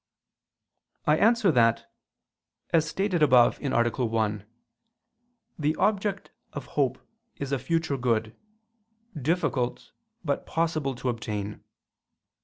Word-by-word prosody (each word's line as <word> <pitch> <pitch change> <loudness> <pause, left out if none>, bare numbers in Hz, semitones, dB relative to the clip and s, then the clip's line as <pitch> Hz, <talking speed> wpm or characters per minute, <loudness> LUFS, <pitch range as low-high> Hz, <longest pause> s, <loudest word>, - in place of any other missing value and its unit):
I 150 - +4
answer 225 -4 +4
that, 115 -4 +3 0.9
As 160 -2 +3
stated 190 -1 -1
above 125 -5 +5
(A. 140 - -2 0.3
1), 110 -3 -1 1.1
the 155 +1 +1
object 205 -2 0 0.2
of 145 -3 -6
hope 140 -4 +1 0.4
is 140 -1 -5
a 140 - 0
future 165 0 -1
good, 115 -3 0 0.8
difficult 140 -4 -1 0.3
but 140 -2 -1
possible 155 -5 -1
to 125 +1 -3
obtain. 105 -3 -4
140 Hz, 100 wpm, -27 LUFS, 120-165 Hz, 1.1 s, above